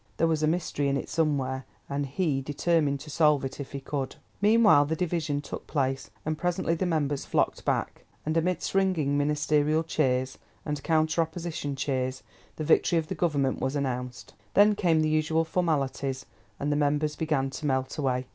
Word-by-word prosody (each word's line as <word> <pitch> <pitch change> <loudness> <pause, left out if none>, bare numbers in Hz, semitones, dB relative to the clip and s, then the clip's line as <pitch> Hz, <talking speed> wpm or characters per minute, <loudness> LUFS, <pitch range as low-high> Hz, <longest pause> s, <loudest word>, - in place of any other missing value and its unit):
There 165 - +3
was 160 -2 +1
a 155 - +2
mystery 155 -3 0
in 140 0 +1
it - - -5
somewhere, 135 -5 0 0.2
and 140 0 -2
he 140 -1 0
determined 145 0 +1
to 150 0 -9
solve 150 -3 +3
it 135 - -6
if 140 - -6
he 140 - -4
could. 135 -1 -4 0.3
Meanwhile 210 -8 +6
the 160 +3 -1
division 160 -4 -1
took 145 - -8
place, 135 -2 -1 0.2
and 155 0 -2
presently 175 -1 0
the 175 +2 -1
members 145 -4 0
flocked - - 0
back, - - -1 0.2
and 155 +1 -1
amidst 175 +1 0
ringing 185 -7 +2
Ministerial 150 +1 +2
cheers, 130 -5 0 0.3
and 150 -2 -3
counter 160 +1 +2
Opposition 160 -3 -3
cheers, 130 -1 -2 0.3
the 155 - -4
victory 165 +2 +3
of 160 -1 -1
the - - -1
Government 145 -6 0
was 130 +2 -1
announced. 125 -3 -3 0.2
Then 205 +1 +6
came 175 -6 +2
the 155 - +2
usual 155 +1 +1
formalities, 140 -6 -1 0.3
and 145 +1 -1
the - - +2
members 150 +1 +1
began 145 -4 0
to 150 - -4
melt 130 -1 0
away. 130 -2 0
150 Hz, 180 wpm, -27 LUFS, 140-160 Hz, 0.3 s, Meanwhile